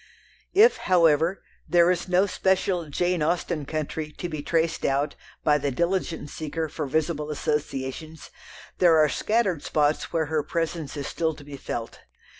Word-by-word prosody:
If, 445 +5 +6
however, 165 0 +3 0.3
there 175 0 +5
is 180 0 -2
no 185 +2 +4
special 190 -3 0
"Jane 175 +3 0
Austen 165 -2 -1
country" 155 0 -3
to 175 - -5
be 155 -3 -5
traced 165 +2 0
out 140 +2 +1 0.3
by 150 -1 +4
the 140 0 -1
diligent 170 0 -1
seeker 160 +1 -3
for 150 -2 -4
visible 150 +1 -1
associations, 150 +1 -3 0.5
there 170 -3 +6
are 155 -1 +5
scattered 205 -8 0
spots 150 0 0
where 160 -1 +1
her 155 0 0
presence 165 -1 -3
is 140 - -4
still 160 -2 -1
to 145 - -13
be 145 0 -9
felt. 120 -3 -5
160 Hz, 155 wpm, -25 LUFS, 150-175 Hz, 0.5 s, If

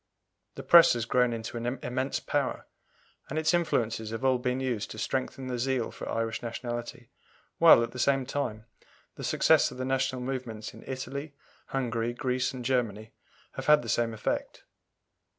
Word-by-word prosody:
The - - -7
Press 170 0 +8
has 120 -2 -2
grown 125 0 +2
into 115 +1 -5
an 120 +3 -2
immense 130 +2 -1
power, - - -2 0.6
and 150 - -4
its 155 +1 +2
influences 115 -10 0
have 115 +4 -4
all 130 -1 +3
been 125 +1 -1
used 125 -5 -2
to - - -8
strengthen 130 +3 -3
the 125 -1 -3
zeal 130 -1 0
for - - -7
Irish 115 0 -2
nationality, 120 +1 -6 0.5
while, 165 -8 +8
at 115 - -4
the 125 - -8
same 135 0 +2
time, 120 -6 -3 0.5
the - - -9
success - - +4
of - - -10
the 130 - -3
national 130 -1 0
movements 125 -5 -5
in - - -13
Italy, 140 +3 -5 0.3
Hungary, 120 -3 -1
Greece, 130 +1 -1
and 125 -2 -7
Germany 115 -4 -1 0.4
have - - -7
had 150 -3 +6
the 115 - -6
same 115 +2 +1
effect. 110 - -3
125 Hz, 170 wpm, -28 LUFS, 115-135 Hz, 0.6 s, Press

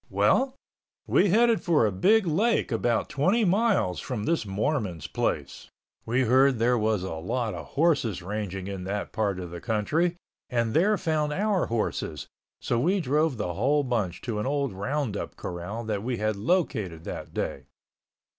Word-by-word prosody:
Well, 265 0 +2 0.5
we 200 - +3
headed 230 +3 +4
for 165 - +3
a 105 - +1
big 205 - +3
lake 200 - +1
about 115 0 +1
twenty 185 - +2
miles 190 - +2
from 120 -5 -4
this 160 -5 0
Mormon's 100 - -1
place. - - -3 0.4
We 120 +3 +2
heard 130 +2 +4
there 120 +2 +3
was 110 -4 +1
a 95 - -4
lot 110 +8 -2
of - - -7
horses 140 - +2
ranging 95 -1 -4
in 100 -2 -5
that 100 +2 -3
part 100 -4 -1
of 90 -2 -6
the 85 - -7
country 150 +11 0 0.3
and 115 -2 0
there 205 +6 +3
found 155 -3 0
our 200 0 +1
horses, 105 -9 -2 0.3
so 120 - 0
we 185 +9 +2
drove 150 -2 +1
the 90 -5 -2
whole 140 - +2
bunch 110 -9 -2
to 110 -3 -2
an 105 - -2
old 140 -4 -1
roundup 115 +2 -3
corral 90 +6 -5
that 105 -3 -2
we 120 +2 -2
had 110 0 0
located 105 - -1
that - - -6
day. - - -3
120 Hz, 165 wpm, -27 LUFS, 100-160 Hz, 0.5 s, headed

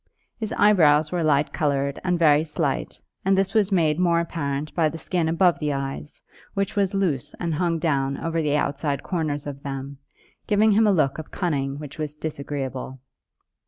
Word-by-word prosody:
His 220 -1 -3
eyebrows 155 -9 +4
were 180 -1 -1
light 150 -1 +2
coloured 140 -2 0
and 180 -1 +1
very 155 -2 +4
slight, 150 -3 -2 0.2
and 195 0 +3
this 195 0 +1
was 210 -3 +2
made 160 -4 +2
more 170 -2 +3
apparent 150 -3 -3
by 160 -3 +2
the 160 - -7
skin 165 -1 -1
above 175 +1 +3
the 150 -2 -1
eyes, 135 +2 -5 0.3
which 200 0 -1
was 200 -1 +1
loose 170 -10 -1
and 170 -2 -1
hung 165 +1 0
down 140 -4 0
over 165 0 -1
the 150 -1 +1
outside 140 -1 -1
corners 155 -5 -2
of 140 -1 -6
them, 135 0 -6 0.5
giving 215 +1 +4
him 215 +2 +4
a - - +5
look 155 -6 +1
of 155 - -8
cunning 140 -6 -2
which 150 +1 -9
was 150 -1 -3
disagreeable. 140 -4 -5
155 Hz, 180 wpm, -24 LUFS, 140-175 Hz, 0.5 s, a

